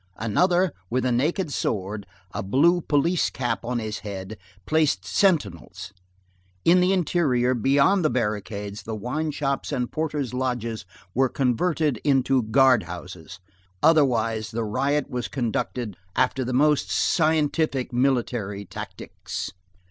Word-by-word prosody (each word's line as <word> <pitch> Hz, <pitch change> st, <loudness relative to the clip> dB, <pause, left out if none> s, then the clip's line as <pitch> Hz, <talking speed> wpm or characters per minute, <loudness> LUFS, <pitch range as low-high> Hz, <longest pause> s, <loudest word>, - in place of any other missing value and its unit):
Another, 175 Hz, -, +2 dB, 0.2 s
with 130 Hz, +1 st, 0 dB
a 125 Hz, -, +2 dB
naked 150 Hz, +6 st, 0 dB
sword, 100 Hz, -1 st, -2 dB, 0.2 s
a -, -, -4 dB
blue 160 Hz, -, +3 dB
police 160 Hz, +4 st, +1 dB
cap 120 Hz, -2 st, -2 dB
on 125 Hz, +1 st, -2 dB
his 110 Hz, -2 st, -4 dB
head, 100 Hz, 0 st, -6 dB, 0.3 s
placed 145 Hz, -, +1 dB
sentinels. 100 Hz, -, 0 dB, 0.7 s
In 175 Hz, +2 st, +6 dB
the 180 Hz, +1 st, +3 dB
interior, 145 Hz, -9 st, +2 dB
beyond 140 Hz, -, +3 dB
the 155 Hz, -, +3 dB
barricades, 105 Hz, -3 st, -3 dB
the 110 Hz, -, -5 dB
wine 125 Hz, +9 st, -2 dB
shops 140 Hz, -1 st, -2 dB
and 125 Hz, -4 st, -2 dB
porters' 150 Hz, -5 st, -2 dB
lodges 120 Hz, -5 st, -2 dB, 0.3 s
were 130 Hz, +1 st, +2 dB
converted 140 Hz, +1 st, 0 dB
into 135 Hz, -2 st, +3 dB
guard 125 Hz, +2 st, +4 dB
houses. 90 Hz, 0 st, -9 dB, 0.4 s
Otherwise 115 Hz, -8 st, +3 dB
the 115 Hz, +1 st, -3 dB
riot 135 Hz, +6 st, 0 dB
was 125 Hz, -1 st, -3 dB
conducted 120 Hz, -3 st, -3 dB, 0.2 s
after 130 Hz, +1 st, +1 dB
the 125 Hz, -, -3 dB
most 150 Hz, +3 st, +2 dB
scientific 155 Hz, -5 st, +1 dB
military 120 Hz, -6 st, 0 dB
tactics. -, -, -7 dB
130 Hz, 125 wpm, -24 LUFS, 110-150 Hz, 0.7 s, In